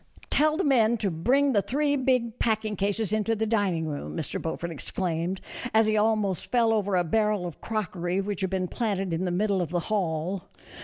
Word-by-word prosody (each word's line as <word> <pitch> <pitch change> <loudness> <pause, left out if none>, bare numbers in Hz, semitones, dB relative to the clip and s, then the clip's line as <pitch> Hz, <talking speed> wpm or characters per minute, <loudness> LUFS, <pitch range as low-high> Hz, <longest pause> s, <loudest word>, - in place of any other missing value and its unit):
"Tell 310 +1 +3
the 380 - +1
men 235 -5 +4
to 200 -3 -1
bring 260 - +2
the 205 - +4
three 285 +6 +1
big 250 -4 0
packing 220 -2 0
cases 205 +1 -1
into 215 +1 +1
the 220 +1 0
dining 200 -7 +1
room," 150 +1 -5
Mr. 160 - -3
Beaufort 170 +1 -3
exclaimed, 170 +3 -2 0.3
as 220 0 +6
he 215 0 +2
almost 210 -4 +1
fell 230 -2 +3
over 205 -3 +1
a 180 - +3
barrel 210 +2 +1
of 175 - -7
crockery 185 -4 -2
which 200 -1 -3
had 190 - 0
been 185 -1 -1
planted 195 -5 -2
in 170 +3 -1
the - - 0
middle 195 +1 +1
of 175 - -2
the 175 +1 0
hall. 180 -2 -1
205 Hz, 200 wpm, -27 LUFS, 180-225 Hz, 0.3 s, as